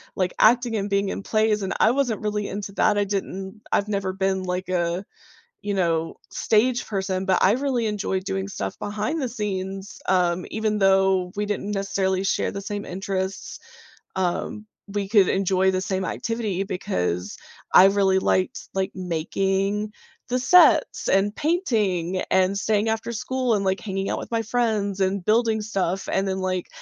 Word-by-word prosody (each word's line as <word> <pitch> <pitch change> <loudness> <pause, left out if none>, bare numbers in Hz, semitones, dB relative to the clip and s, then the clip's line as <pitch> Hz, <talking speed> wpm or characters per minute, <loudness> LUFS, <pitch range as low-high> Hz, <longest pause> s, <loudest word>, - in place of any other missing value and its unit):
like, 185 -1 0
acting 240 +1 +4
and 200 0 -2
being 200 0 +1
in - - -4
plays 215 -1 +1
and 190 - -2
I 220 - +5
wasn't 250 -5 0
really 210 -1 -2
into 200 0 -5
that, 210 0 +2
I 205 - +3
didn't 195 +1 -4
I've 200 - +2
never 195 -2 -2
been 190 0 0
like 180 0 -3
a, 175 +1 -1 0.6
you 205 -1 -2
know, 165 -3 0 0.2
stage 240 +3 +1
person, 190 -2 -2
but 190 -2 +2
I 190 - +6
really 255 -3 0
enjoyed 200 -3 -1
doing 190 0 -2
stuff 95 - -5
behind 215 +10 -2
the 255 - -1
scenes, 195 -3 -4
um, 180 -1 +2
even 215 -1 -1
though 190 -1 +3
we 210 0 -1
didn't 205 0 -3
necessarily 195 -1 0
share 195 - 0
the 200 - -5
same 205 +1 -4
interests, 190 +1 -4 0.6
um, 190 +3 -2 0.3
we 200 -1 -2
could 200 -3 +5
enjoy 190 0 +2
the 185 0 -1
same 190 0 -2
activity 215 -2 -2
because 90 - -2 0.4
I 185 - +9
really 195 -1 +3
liked, 185 +6 0
like, 190 0 -1
making 195 +4 -1 0.4
the 250 - +1
sets 360 +8 +5
and 200 +2 +2
painting 210 - 0
and 190 +1 +3
staying 210 +1 +1
after 225 +1 -2
school 255 +2 -1
and, 200 - -1
like, 190 +1 +1
hanging 195 -2 -3
out - - -1
with - - -8
my 230 -1 +1
friends 215 -4 0
and 190 -1 0
building 220 0 +2
stuff, 195 -3 -2
and 195 +1 +1
then, 190 0 -1
like, 185 -1 -2
195 Hz, 170 wpm, -24 LUFS, 190-215 Hz, 0.6 s, I